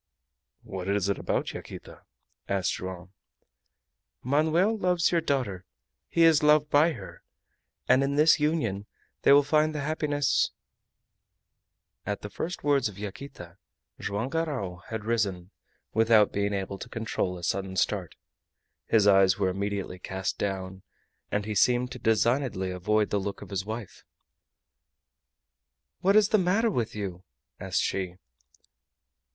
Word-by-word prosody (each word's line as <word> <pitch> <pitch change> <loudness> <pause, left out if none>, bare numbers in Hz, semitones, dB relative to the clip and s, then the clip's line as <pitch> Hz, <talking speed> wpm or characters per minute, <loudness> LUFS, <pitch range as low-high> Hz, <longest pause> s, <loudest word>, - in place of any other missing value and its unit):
"What 95 -1 -6
is 100 -1 +1
it 100 - -1
about, - - -2
Yaquita?" - - -10 0.5
asked 95 -4 0
Joam. 95 0 -7 1.1
"Manoel 160 - +2
loves 180 -4 +1
your 170 -1 +2
daughter, 125 - -1 0.5
he 170 - +3
is 165 -3 +6
loved 150 0 +4
by 155 +3 +4
her, 95 - -10 0.7
and 130 - +5
in 140 +1 -1
this 155 +2 +5
union 115 -11 -1 0.3
they - - +5
will 145 +1 +7
find 155 +2 +2
the 150 - -2
happiness 145 -1 +1 0.8
" - - -57 0.8
At 105 -1 -3
the 105 - -7
first 175 +2 -5
words 140 -5 +2
of 100 - -13
Yaquita 100 -3 -9 0.4
Joam 105 +5 -3
Garral 140 - -2
had 110 -2 -5
risen, 100 -5 -1 0.4
without 110 -2 +4
being 100 0 0
able 95 0 -4
to 125 - -8
control 110 -6 -2
a 85 - -11
sudden 95 +1 -2
start. 95 -2 -1 0.7
His 110 -3 +4
eyes 95 -2 +5
were 95 -2 +1
immediately 100 -1 -3
cast 95 +1 -4
down, 95 -1 -3 0.5
and 105 -1 -1
he 110 - -3
seemed 125 +4 +2
to 125 - -7
designedly 115 -4 +1
avoid 105 +4 0
the 105 - +1
look 100 +1 -5
of - - -13
his 95 -1 -2
wife. 110 -2 -7 2.0
"What 195 +2 +3
is 210 -1 +5
the 215 - +4
matter 200 +6 +2
with 115 - -2
you?" 95 -4 -5 0.4
asked 90 -1 -1
she. 90 -2 -2
105 Hz, 140 wpm, -27 LUFS, 95-145 Hz, 2.0 s, will